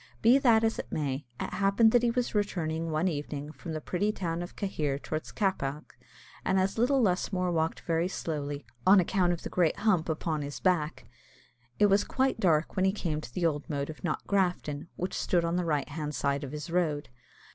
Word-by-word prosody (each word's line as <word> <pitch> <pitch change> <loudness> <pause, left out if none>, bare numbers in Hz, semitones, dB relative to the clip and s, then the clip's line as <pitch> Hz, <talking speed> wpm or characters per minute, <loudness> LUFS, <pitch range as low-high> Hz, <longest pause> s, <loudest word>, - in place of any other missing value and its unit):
Be 245 +5 +7
that 230 -4 +5
as 225 0 +1
it - - -6
may, 140 -3 -2
it - - -4
happened 200 +3 +4
that 245 - +5
he 240 - +2
was 245 +1 -1
returning 165 -6 -1
one 155 +3 +1
evening 145 -2 -4
from 160 +1 -7
the 155 - -2
pretty 195 +7 0
town 170 -4 -3
of 175 - -7
Cahir 150 -9 -1
towards 155 +2 -5
Cappagh, 150 -7 -1 0.6
and 190 - +2
as 190 +3 0
little 260 +2 +3
Lusmore 185 -1 +1
walked 160 -1 0
very 165 +1 0
slowly, 145 -5 -4 0.2
on 195 +7 +7
account 180 0 +2
of 175 - -3
the - - -4
great 175 -1 +2
hump 185 -7 +2
upon 155 -1 -1
his 145 0 -5
back, 170 -5 0 0.7
it 210 - +5
was 200 0 +4
quite 265 -2 0
dark 165 -6 +2
when 190 -1 +2
he 190 - +4
came 165 -6 -2
to 120 - -9
the 175 +6 -1
old 150 0 -1
moat 140 0 -2
of 155 - -13
Knockgrafton, 175 -4 -1
which 180 +1 -3
stood 175 -2 +1
on 170 +1 0
the 180 -1 0
right 150 -3 0
hand 150 0 -4
side 140 +2 0
of 135 - -6
his 150 +3 -6
road. 155 -6 0
170 Hz, 205 wpm, -29 LUFS, 150-195 Hz, 0.7 s, Be